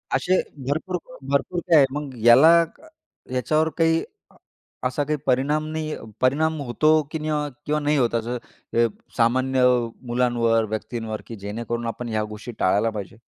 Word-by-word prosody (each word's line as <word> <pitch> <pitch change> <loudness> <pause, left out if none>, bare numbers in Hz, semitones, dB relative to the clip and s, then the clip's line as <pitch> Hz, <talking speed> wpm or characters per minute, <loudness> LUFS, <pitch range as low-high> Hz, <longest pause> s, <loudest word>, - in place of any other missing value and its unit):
असे 185 +1 +2 0.3
भरपूर 165 +6 -1
क 255 - -13
भरपूर 140 +5 0
काय 165 - +6
आहे. 140 - +7
मग 145 0 -4 0.2
याला 125 +7 +8 0.8
याच्यावर 155 +5 +1
काही 165 -1 +3 0.3
अ, - - -24 0.5
असा 130 +3 -1
काही 150 +1 -1
परिणाम 140 +4 +1
नाही 155 -1 -3 0.3
परिणाम 155 +5 +2
होतो 155 +5 +3
की 160 - -3
नाही 155 0 -3
हो 150 - +1 0.3
किंवा 150 0 0
नाही 150 0 +1
होत, 120 -3 +1
असं 120 +2 -1 0.4
अ, 120 - +5 0.3
सामान्य 130 +2 +2 0.4
मुलांवर, 120 -2 +2
व्यक्तींवर 110 0 -4
की 115 - -7
जेणेकरून 115 +3 -4
आपण 120 +1 -5
ह्या 110 -1 0
गोष्टी 110 +3 -7
टाळायला 100 +4 +2
पाहिजे? 105 -1 -7
130 Hz, 160 wpm, -23 LUFS, 115-155 Hz, 0.8 s, याला